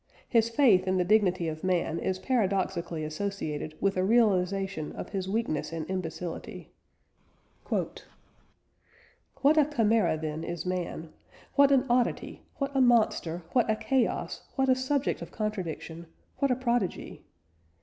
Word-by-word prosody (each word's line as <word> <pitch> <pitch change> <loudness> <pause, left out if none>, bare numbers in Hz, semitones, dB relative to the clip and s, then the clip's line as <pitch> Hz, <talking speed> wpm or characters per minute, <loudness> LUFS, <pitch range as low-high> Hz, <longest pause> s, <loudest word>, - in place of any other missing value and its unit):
His 230 -2 +3
faith 230 -8 +4
in 185 0 +2
the 180 - +3
dignity 185 -4 +3
of 155 0 -5
man 175 -3 0
is 185 - -1
paradoxically 190 -7 -1
associated 155 -2 -4
with 195 -1 +1
a 185 - +2
realisation 195 -5 +1
of - - -7
his 190 -2 -3
weakness 155 -9 -1
and 160 -1 -4
imbecility: 175 -2 -5 1.0
"What - - -2 1.4
a 305 +1 +6
chimera, 225 - +2
then, 155 0 -4
is 170 -1 -5
man! 175 -3 -4 0.4
What 280 -1 +5
an 270 -1 +4
oddity, 245 -1 0
what 275 0 -3
a 270 - +4
monster, 215 -8 +2
what 245 -3 +2
a 220 - +3
chaos, 260 +2 -1
what 265 -1 +1
a 260 - +6
subject 260 +2 -1
of - - -7
contradiction, 170 -6 -4 0.3
what 275 - +2
a 250 - +3
prodigy! 240 -6 -2
195 Hz, 140 wpm, -28 LUFS, 170-240 Hz, 1.4 s, a